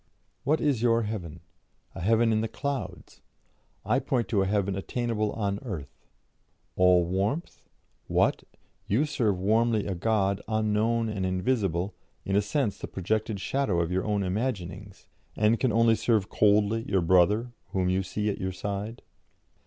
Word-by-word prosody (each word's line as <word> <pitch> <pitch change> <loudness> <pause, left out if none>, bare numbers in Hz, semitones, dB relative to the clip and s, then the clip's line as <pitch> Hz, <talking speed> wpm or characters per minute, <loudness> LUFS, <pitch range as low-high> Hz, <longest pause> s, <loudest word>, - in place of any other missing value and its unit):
What 150 +3 +2
is 140 -7 +1
your 115 -1 +3
heaven? 90 -7 -5 0.5
A - - -7
heaven 115 +4 +3
in 110 0 +2
the 110 - -1
clouds! 140 +4 -5 0.6
I - - +2
point 120 -6 -1
to 100 - +2
a 95 - +1
heaven 100 -1 0
attainable 110 +1 -2
on 100 -2 -2
earth. 85 - -8 0.7
'All 90 -1 +5
warmth'? 100 - -3 0.4
What! - - +2 0.5
you 120 +10 +2
serve 115 -10 0
warmly 110 +2 +2
a 100 - -2
God 100 +1 0
unknown 110 +1 +1
and 105 -3 -3
invisible, 95 -1 0 0.3
in 95 - -1
a 100 - +4
sense 105 +1 -1
the - - -5
projected 110 +2 -2
shadow 105 -4 0
of 85 0 -1
your 95 +1 0
own 105 -2 0
imaginings, 100 -2 -4 0.3
and 110 +2 +2
can 130 - +2
only 115 +1 +4
serve 110 -3 +1
coldly 105 +1 +3
your 95 -2 +2
brother 95 +7 +3 0.2
whom 95 -1 -1
you 95 +1 +1
see 105 +3 -3
at 105 - -1
your 95 0 -1
side? 100 +4 -5
105 Hz, 155 wpm, -27 LUFS, 95-115 Hz, 0.7 s, All